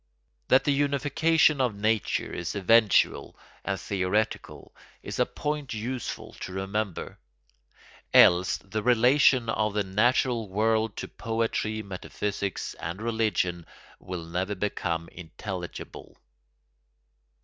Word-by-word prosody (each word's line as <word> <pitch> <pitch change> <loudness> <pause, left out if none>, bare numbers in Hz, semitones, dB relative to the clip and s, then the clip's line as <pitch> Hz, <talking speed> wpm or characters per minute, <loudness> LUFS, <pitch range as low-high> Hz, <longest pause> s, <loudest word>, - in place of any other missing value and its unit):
That 130 - +5
the 145 - +2
unification 145 +2 +2
of 125 -5 0
nature 110 +1 0
is 85 +2 -4
eventual 105 +1 +3 0.3
and 95 - -2
theoretical 100 +2 -2 0.3
is - - -6
a - - +3
point 150 -4 -4
useful 120 +3 -5
to - - -6
remember: 95 0 -3 0.9
else 90 +1 +6
the 105 +2 -5
relation 125 +1 +4
of 110 -2 0
the 105 - +1
natural 115 +3 +1
world 110 +2 +1
to - - -4
poetry, 110 -1 -2
metaphysics, 100 0 -4
and 85 +3 -5
religion 110 -6 0 0.4
will 90 -2 -6
never 90 +4 -2
become 85 -4 -2
intelligible. 90 +1 -8
105 Hz, 105 wpm, -27 LUFS, 95-120 Hz, 0.9 s, else